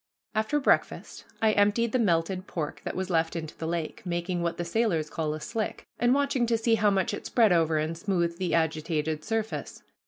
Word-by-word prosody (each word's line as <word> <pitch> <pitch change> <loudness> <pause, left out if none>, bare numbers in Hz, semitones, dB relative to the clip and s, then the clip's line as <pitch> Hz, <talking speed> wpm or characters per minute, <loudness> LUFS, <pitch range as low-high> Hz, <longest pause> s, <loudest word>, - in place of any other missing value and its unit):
After 220 +7 +1
breakfast 275 - 0 0.2
I 220 - +5
emptied 210 +3 +2
the 255 - +1
melted 185 -2 +1
pork 155 -4 -4
that - - -3
was 190 0 -3
left 165 0 +1
into 160 -2 -5
the 160 - -5
lake, 165 -1 -3
making 175 0 -2
what 170 0 -1
the 175 - -3
sailors 170 -6 0
call 155 -2 -2
a - - -6
"slick," 225 +4 -4
and 240 +1 +3
watching 280 -4 +1
to 230 0 +2
see 225 +1 +1
how 210 -2 +4
much 195 -2 +1
it - - -5
spread 225 -5 +4
over 165 -2 +3
and 155 +2 -1
smoothed 170 -2 -1
the 185 -3 0
agitated 160 -1 0
surface. 225 +2 -3
180 Hz, 205 wpm, -28 LUFS, 165-220 Hz, 0.2 s, I